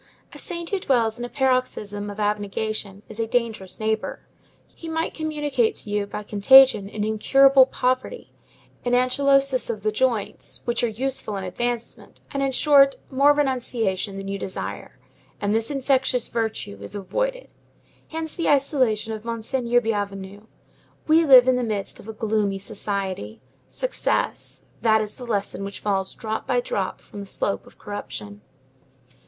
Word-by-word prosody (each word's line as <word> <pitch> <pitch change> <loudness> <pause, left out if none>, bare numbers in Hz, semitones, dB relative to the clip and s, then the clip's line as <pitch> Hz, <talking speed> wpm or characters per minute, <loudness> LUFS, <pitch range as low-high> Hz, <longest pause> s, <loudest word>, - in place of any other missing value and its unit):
A - - -10
saint 340 -1 -5
who 395 - 0
dwells 235 -8 +1
in 240 - -3
a - - -7
paroxysm 245 -6 -1
of 205 +1 -8
abnegation 205 0 -2
is 220 0 -11
a 225 - 0
dangerous 220 -6 -2
neighbor; 220 0 -2 0.5
he 330 - -9
might 320 0 -1
communicate 295 -7 0
to 205 - -8
you, 205 -1 0
by 210 - -6
contagion, 210 0 +6
an 210 0 -3
incurable 265 +5 +5
poverty, 255 - -2 0.5
an 245 - 0
anchylosis 270 +1 +3
of 215 -3 -4
the 215 - +1
joints, 225 -2 -1
which 240 0 0
are - - +4
useful 230 -2 -3
in 195 - -4
advancement, 235 +5 -4
and 275 - -2
in 275 -1 +1
short, 275 0 +5 0.2
more 275 +2 +5
renunciation 235 -9 -1
than 195 0 -6
you 200 0 -3
desire; 190 - -6 0.4
and 205 0 0
this 225 0 0
infectious 265 -3 +1
virtue 220 - -3
is 100 - -8
avoided. - - -2 0.6
Hence 320 -1 -5
the 335 - -1
isolation 255 -6 +2
of 215 -1 -7
Monseigneur 235 +1 0
Bienvenu. 205 -2 -4 0.6
We 320 +2 +5
live 260 -3 +8
in 255 -1 +4
the 250 - 0
midst 210 -4 -3
of - - -13
a 220 - -6
gloomy 210 -2 0
society. 195 - -4 0.3
Success; - - -2 0.2
that 220 -1 +4
is 215 -1 -3
the 245 - -10
lesson 200 -3 -2
which 200 0 -6
falls 195 -2 -1
drop 220 -1 -4
by - - +2
drop - - -3
from 205 - -11
the 200 - -7
slope 195 - -2
of - - -18
corruption. 130 - -7
225 Hz, 160 wpm, -24 LUFS, 205-265 Hz, 0.6 s, live